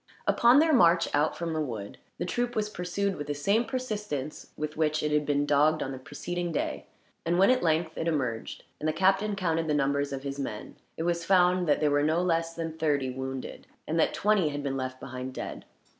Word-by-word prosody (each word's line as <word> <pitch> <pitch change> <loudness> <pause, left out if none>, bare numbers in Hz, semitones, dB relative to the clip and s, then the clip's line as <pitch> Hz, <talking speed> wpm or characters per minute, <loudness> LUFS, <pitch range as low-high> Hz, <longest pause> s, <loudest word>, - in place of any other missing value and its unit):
Upon 240 +3 +5
their 315 +1 +5
march 170 -8 +5
out 150 +2 +1
from 170 -1 -3
the 155 - -1
wood, 110 -8 -5 0.2
the - - -2
troop 245 +6 -2
was 210 -1 -1
pursued 190 +2 -2
with 145 -1 -5
the 145 - -2
same 200 +11 +2
persistence 210 - -4
with 150 0 -4
which 155 -1 +1
it 150 - 0
had 150 -1 +1
been 145 0 +2
dogged 150 +2 +3
on 135 - -4
the 130 - -6
preceding 170 +5 -4
day; 155 - -3 0.4
and 170 +1 +1
when 195 +6 +6
at 255 - +2
length 160 0 +1
it 165 - -1
emerged, 130 -8 -2 0.2
and 155 - 0
the - - 0
captain 195 +4 +2
counted 165 -4 0
the 150 - +1
numbers 140 0 +1
of 135 -1 -5
his 140 0 -5
men, 110 -6 -5 0.2
it 160 - -2
was 170 0 0
found 180 0 +3
that 145 - +2
there 150 -1 +3
were 145 0 +3
no 155 +3 +2
less 165 -2 0
than 165 -1 -4
thirty 145 -5 0
wounded, 130 0 -6 0.2
and 160 +2 0
that - - +3
twenty 205 -6 +2
had 145 0 -4
been 135 -1 -2
left 130 -1 -4
behind, 130 +1 -6
dead. - - -6
155 Hz, 220 wpm, -28 LUFS, 145-180 Hz, 0.4 s, when